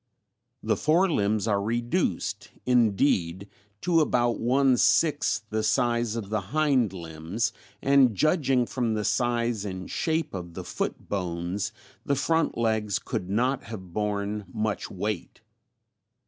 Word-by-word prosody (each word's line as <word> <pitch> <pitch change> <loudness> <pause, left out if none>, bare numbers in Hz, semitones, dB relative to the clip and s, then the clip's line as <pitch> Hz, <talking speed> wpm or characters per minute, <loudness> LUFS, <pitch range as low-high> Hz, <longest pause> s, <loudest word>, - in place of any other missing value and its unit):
The - - +2
fore 170 +5 +3
limbs 105 -3 +1
are 100 -2 +2
reduced 120 +3 -1 0.2
indeed 100 -6 +2 0.3
to 170 -2 +3
about 120 -5 +1
one 130 +2 +3
sixth 145 -8 +3
the 110 0 0
size 120 0 +1
of 110 -4 -4
the 110 -1 0
hind 130 +1 +1
limbs 85 +4 -3 0.3
and 135 -5 +5
judging 135 - +2
from 120 -3 -1
the 105 -1 -2
size 120 -3 0
and 95 -2 -5
shape 160 0 -1
of 85 -3 -6
the - - -5
foot - - -4
bones 90 +1 -2 0.3
the 140 - +1
front 160 +4 +1
legs 110 -3 +1
could 90 - -4
not 125 +6 0
have 95 -6 -9
borne 105 0 -2
much 110 0 -2
weight. 100 0 -4
110 Hz, 135 wpm, -27 LUFS, 100-125 Hz, 0.3 s, and